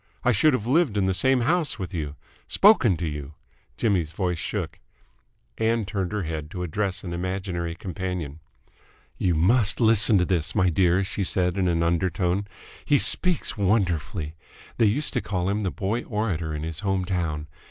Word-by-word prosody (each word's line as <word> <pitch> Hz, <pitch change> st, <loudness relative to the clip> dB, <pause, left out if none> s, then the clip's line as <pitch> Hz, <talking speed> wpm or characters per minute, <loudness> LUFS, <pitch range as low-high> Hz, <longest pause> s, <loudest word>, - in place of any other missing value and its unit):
I 125 Hz, -, +4 dB
should 140 Hz, +7 st, +4 dB
have 110 Hz, -, -4 dB
lived 135 Hz, -4 st, +2 dB
in 100 Hz, -, +2 dB
the 95 Hz, -, +1 dB
same 130 Hz, +6 st, +3 dB
house 155 Hz, -1 st, +1 dB
with 95 Hz, -2 st, -6 dB
you, 75 Hz, -4 st, -4 dB, 0.3 s
spoken 145 Hz, -, +5 dB
to 85 Hz, -, -3 dB
you 75 Hz, -1 st, -6 dB, 0.2 s
!" -, -, -38 dB
Jimmy's 90 Hz, -8 st, 0 dB
voice 90 Hz, -2 st, -2 dB
shook. -, -, -4 dB, 0.8 s
Ann 110 Hz, 0 st, +1 dB
turned 95 Hz, -1 st, -3 dB
her 105 Hz, -2 st, -2 dB
head 80 Hz, -2 st, -5 dB
to 90 Hz, +2 st, -5 dB
address 90 Hz, +1 st, -2 dB
an 85 Hz, -3 st, -5 dB
imaginary 90 Hz, -1 st, -3 dB
companion. 90 Hz, -4 st, -5 dB, 0.8 s
"You 90 Hz, -3 st, +1 dB
must 105 Hz, +6 st, +3 dB
listen 110 Hz, -2 st, +4 dB
to 90 Hz, -, +2 dB
this, 90 Hz, -1 st, -1 dB
my 95 Hz, -4 st, +3 dB
dear," 90 Hz, +2 st, +3 dB
she 100 Hz, +1 st, -3 dB
said 90 Hz, -1 st, +1 dB
in 95 Hz, -2 st, +1 dB
an 85 Hz, -1 st, +1 dB
undertone. 90 Hz, +3 st, 0 dB, 0.4 s
"He 145 Hz, -, +3 dB
speaks 180 Hz, -, +3 dB
wonderfully! 90 Hz, -5 st, 0 dB, 0.5 s
They 115 Hz, -, +5 dB
used 140 Hz, +9 st, 0 dB
to -, -, 0 dB
call 90 Hz, 0 st, -2 dB
him 100 Hz, +1 st, 0 dB
the 100 Hz, -3 st, -1 dB
Boy 100 Hz, +6 st, -2 dB
Orator 105 Hz, -9 st, -2 dB
in 75 Hz, -, -5 dB
his 80 Hz, -1 st, -4 dB
home 95 Hz, -2 st, -1 dB
town. 85 Hz, -5 st, -2 dB
95 Hz, 180 wpm, -25 LUFS, 85-105 Hz, 0.8 s, spoken